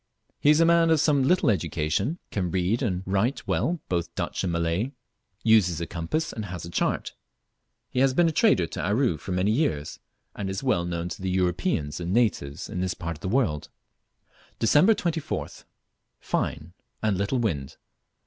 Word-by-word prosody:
He 145 - +3
is 150 +1 +6
a 165 - +6
man 170 0 +4
of 160 -1 +4
some 145 -2 +3
little 150 -2 +3
education, 100 - -1
can 90 -3 -1
read 95 +7 0
and 95 -7 -1
write 100 +8 0
well 170 +1 0
both 85 -2 -2
Dutch - - -2
and 90 - 0
Malay, 85 +10 -1 0.5
uses 105 -7 +4
a 85 - -2
compass, 85 - -3
and 110 - -5
has 90 -3 -6
a 85 - -8
chart. - - -1 0.8
He 125 - -1
has 135 0 +3
been 175 +2 +4
a - - +2
trader 200 - +3
to - - -5
Aru 105 - +1
for 85 - -7
many 90 +3 +1
years, 80 - -1 0.4
and 100 -2 -3
is 95 +4 -4
well 90 -10 +1
known 85 0 -3
to 90 - -7
both 95 - -2
Europeans 90 -5 0
and 85 0 -3
natives 100 -12 0
in 90 - -4
this 90 -1 -1
part 85 -2 -5
of - - -24
the 95 - -3
world. 95 - 0 0.9
Dec. 145 - +5
24th. 165 -5 -3 0.5
Fine, 80 +3 -3 0.3
and 105 -2 +2
little 100 +7 0
wind. 80 - -2
95 Hz, 180 wpm, -26 LUFS, 85-135 Hz, 0.9 s, is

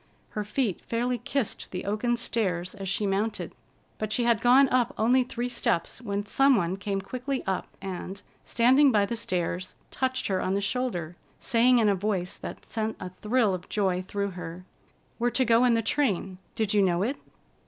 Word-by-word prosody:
Her 210 - -3
feet 210 -2 -1
fairly 240 +1 -1
kissed 270 0 -2
the 180 - -5
oaken 215 +4 0
stairs 185 -7 -1
as 195 -2 -5
she 205 +2 0
mounted; 205 +3 -1 0.5
but 215 -1 -3
she 240 +3 +1
had 235 -3 +2
gone 260 +3 +6
up 250 -2 +1
only 250 +4 +4
three 245 0 -3
steps 225 -4 -1
when 205 -3 -3
some 270 +5 +4
one 180 -3 0
came 195 0 -3
quickly 255 +6 -4
up 190 -1 -2 0.2
and, 190 +1 -5 0.2
standing 260 +4 +4
by 205 -3 +3
the 235 - -3
stairs, 185 -4 -2 0.2
touched 260 0 -1
her 190 -2 0
on 190 - 0
the - - +1
shoulder, 200 -6 -2 0.2
saying 245 +2 +4
in 225 -2 +4
a 205 - +4
voice 190 -2 -2
that - - -8
sent 220 0 -2
a 180 - -6
thrill 215 +2 +1
of 180 -1 -6
joy 190 -3 +1
through 200 +1 -3
her: 175 0 -8 0.5
"We're 240 +1 +2
to 260 +1 +1
go 230 +1 +4
in 240 -2 +4
the 225 - +1
train; 200 -8 0 0.2
did 215 -2 0
you 205 - +4
know 180 -1 +2
it?" 260 +6 -1
210 Hz, 190 wpm, -27 LUFS, 190-245 Hz, 0.5 s, gone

